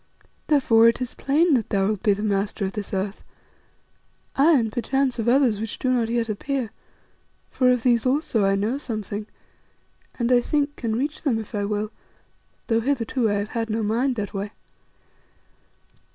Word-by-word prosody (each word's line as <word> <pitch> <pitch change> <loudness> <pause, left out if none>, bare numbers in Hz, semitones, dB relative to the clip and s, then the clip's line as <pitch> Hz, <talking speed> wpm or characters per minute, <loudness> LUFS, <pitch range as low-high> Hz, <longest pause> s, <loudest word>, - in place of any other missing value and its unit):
Therefore 235 -7 +5
it 230 - +3
is 250 -1 -4
plain 310 +4 +2
that 235 -6 +1
thou 195 -1 +1
wilt 210 -1 -1
be 205 - +3
the 205 +2 -4
master 200 0 -1
of 190 - -2
this 210 -2 -5
earth, 195 +1 -3 1.1
aye, 300 +3 +5
and 225 -3 0
perchance 260 +2 0
of 225 +1 +1
others 245 -5 +3
which 220 -1 -4
do 255 - 0
not 235 -3 +1
yet 235 -1 0
appear, 235 +2 -3 0.8
for 255 -1 +3
of 250 -2 +2
these 235 -3 +3
also 255 -4 +1
I 195 0 +3
know 215 +7 -1
something, 215 -4 -5 0.9
and, 240 0 0
I 245 -1 +5
think, 290 +2 0
can 225 -2 -2
reach 285 +5 -2
them 265 -7 +1
if 220 -2 -7
I 205 -1 -1
will, 210 +1 -2 0.7
though 225 -1 +1
hitherto 245 -2 0
I - - +1
have 205 +1 -2
had 230 -1 -3
no 220 +1 -1
mind 240 +5 +1
that 210 -3 -4
way. 200 +1 -3
230 Hz, 180 wpm, -24 LUFS, 210-255 Hz, 1.1 s, Therefore